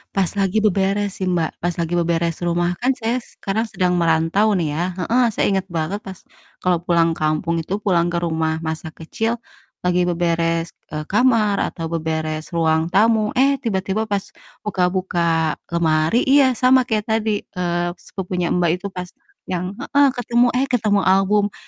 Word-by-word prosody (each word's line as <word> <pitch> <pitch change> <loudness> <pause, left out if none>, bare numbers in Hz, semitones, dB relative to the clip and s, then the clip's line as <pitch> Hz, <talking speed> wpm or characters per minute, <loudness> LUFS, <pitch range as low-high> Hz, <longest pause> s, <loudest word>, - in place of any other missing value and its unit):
pas 190 -3 +1
lagi 195 +1 +1
beberes 200 0 0
sih, 185 - 0
Mbak, 170 -3 +1
pas 175 0 0
lagi 170 0 -2
beberes 170 -1 +1
rumah 175 0 +1
kan 255 +2 +3
saya 235 +2 -1
sekarang 220 0 -3
sedang 185 -4 0
merantau 170 +6 +2
nih 155 -4 -1
ya, 155 - -2 0.2
heeh, 235 +7 +2
saya 215 - 0
inget 190 -1 -1
banget 170 +4 -2
pas 190 -1 -9 0.5
kalo 180 -2 +2
pulang 170 -1 +2
kampung 160 +2 -1
itu 185 +5 -3
pulang 175 -4 +2
ke 170 - -2
rumah 160 -2 -1
masa 160 0 -4
kecil 225 +9 -3 0.5
lagi 180 0 +2
beberes, 165 -1 0 0.2
eee, 150 0 -5
kamar 215 0 +2
atau 165 - -6
beberes 155 -1 -3
ruang 160 -1 +1
tamu, 215 +2 +3
eh, 275 +2 +4
tiba-tiba 215 -1 -1
pas 200 -1 0 0.4
buka-buka 180 -4 0 0.2
lemari 165 +5 +2
iya, 265 -2 +4
sama 255 +2 +5
kayak 215 -2 0
tadi, 220 -2 -1
eee, 175 -1 -2
sepupunya, 180 -2 -3
Mbak, 175 -1 +2
itu 200 - -3
pas 180 -1 -6 0.4
yang 180 +2 -4
heeh, 285 +3 +3
ketemu, 245 0 +2
"Eh, 265 - +2
ketemu 215 -6 +1
album." 195 +2 +3
180 Hz, 160 wpm, -20 LUFS, 165-210 Hz, 0.5 s, sama